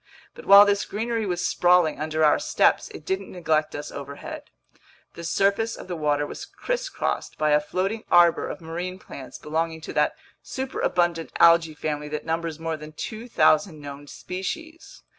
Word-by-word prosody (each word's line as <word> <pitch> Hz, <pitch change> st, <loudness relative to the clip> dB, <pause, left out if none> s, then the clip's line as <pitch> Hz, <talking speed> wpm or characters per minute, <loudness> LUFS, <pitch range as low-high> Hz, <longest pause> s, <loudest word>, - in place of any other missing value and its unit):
But -, -, -13 dB
while 200 Hz, +1 st, +10 dB
this 200 Hz, 0 st, +1 dB
greenery 225 Hz, 0 st, -2 dB
was 175 Hz, -1 st, -1 dB
sprawling 175 Hz, -4 st, +3 dB
under 155 Hz, +1 st, +1 dB
our 150 Hz, -, +4 dB
steps, -, -, +2 dB
it 155 Hz, -, -11 dB
didn't 190 Hz, +2 st, -3 dB
neglect 155 Hz, -4 st, 0 dB
us 145 Hz, -, -6 dB
overhead. 140 Hz, 0 st, -8 dB, 0.6 s
The 170 Hz, -, -9 dB
surface 200 Hz, +6 st, +1 dB
of -, -, -10 dB
the 180 Hz, -, -4 dB
water 145 Hz, -2 st, 0 dB
was -, -, -7 dB
crisscrossed -, -, -3 dB
by 155 Hz, -1 st, +1 dB
a 150 Hz, -, +5 dB
floating 190 Hz, +8 st, -2 dB
arbor 175 Hz, -1 st, +5 dB
of -, -, -7 dB
marine 175 Hz, +3 st, -5 dB
plants 135 Hz, -8 st, -10 dB
belonging 160 Hz, +1 st, -2 dB
to -, -, -7 dB
that -, -, +2 dB, 0.3 s
superabundant 175 Hz, -10 st, -1 dB
algae 165 Hz, -2 st, +5 dB
family 150 Hz, -1 st, -3 dB
that 150 Hz, 0 st, -5 dB
numbers 165 Hz, -1 st, -2 dB
more 165 Hz, -1 st, -3 dB
than 155 Hz, 0 st, -11 dB
2,000 200 Hz, -5 st, +1 dB
known 145 Hz, 0 st, -9 dB
species. 320 Hz, -, -7 dB
170 Hz, 160 wpm, -25 LUFS, 155-195 Hz, 0.6 s, while